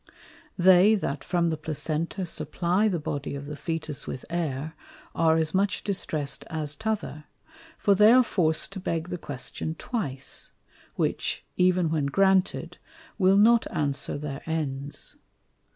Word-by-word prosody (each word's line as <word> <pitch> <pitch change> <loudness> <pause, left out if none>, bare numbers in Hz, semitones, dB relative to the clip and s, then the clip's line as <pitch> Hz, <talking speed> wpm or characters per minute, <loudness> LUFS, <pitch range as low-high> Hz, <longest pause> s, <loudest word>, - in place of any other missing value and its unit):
They 185 +3 +6
that 145 -8 -3
from 175 -2 +1
the 160 - -2
Placenta 155 +4 -3
supply 175 +5 0
the 190 -5 0
Body 145 -2 -4
of 140 0 -6
the 150 - -6
Fœtus 155 -2 -4
with 130 - -6
Air, 155 -3 -2 0.4
are 160 -1 +3
as 160 -1 0
much 195 +1 +1
distress'd 155 -7 -2
as 155 -3 -3
t'other; 215 -9 -3 0.5
for 200 - +3
they 210 +3 +7
are 255 +1 +7
forc'd 170 -4 0
to 195 - -5
beg 165 -2 -2
the 180 - -4
Question 145 +3 -5
twice, 140 - -4 0.4
which, - - -1
even 180 -2 +3
when 150 -3 +1
granted, 190 +4 +2 0.4
will 190 0 +5
not 230 +3 +5
answer 145 -4 -1
their 145 -1 -5
Ends. 145 -3 -3
165 Hz, 140 wpm, -27 LUFS, 150-190 Hz, 0.5 s, they